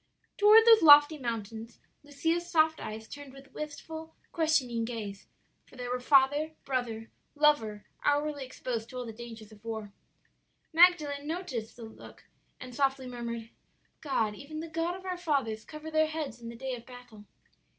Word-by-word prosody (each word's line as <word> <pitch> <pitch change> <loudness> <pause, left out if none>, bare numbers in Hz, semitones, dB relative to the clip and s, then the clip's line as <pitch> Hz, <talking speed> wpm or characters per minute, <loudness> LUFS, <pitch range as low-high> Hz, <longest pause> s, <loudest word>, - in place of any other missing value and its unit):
"Toward 430 +2 +7
those 455 -1 +8
lofty 295 0 +8
mountains 230 -2 -5 0.2
Lucia's 325 +4 -2
soft 315 -1 +3
eyes 220 +1 -7
turned 285 -2 -10
with 275 0 -15
wistful, 320 +2 -7 0.2
questioning 280 -8 +1
gaze; 215 -4 -6 0.4
for - - -18
there 245 -1 -5
were 250 - -1
father, 285 +4 +3
brother, 235 -4 -3 0.2
lover, 285 -9 +2 0.2
hourly 290 -1 +1
exposed 240 -3 -5
to 255 - -8
all 250 - -4
the 225 - -7
dangers 225 -1 -10
of 210 -1 -17
war. 220 -3 -6 0.8
"Magdalen 310 -4 +4
noted 305 -10 -4
the 235 - -10
look, 220 0 -13 0.3
and 255 -1 -9
softly 270 0 0
murmured, 235 -2 -6 0.5
'God, 225 -8 0
even 280 +8 -8
the 330 - -5
God 330 +2 -2
of 375 0 -11
our 365 -1 -3
fathers, 270 -10 -1
cover 310 +1 -9
their 315 0 +3
heads 305 -7 -5
in 230 - -7
the 235 - -9
day 260 +2 -4
of 235 -2 -7
battle!' 245 -4 -13
270 Hz, 160 wpm, -30 LUFS, 230-310 Hz, 0.8 s, those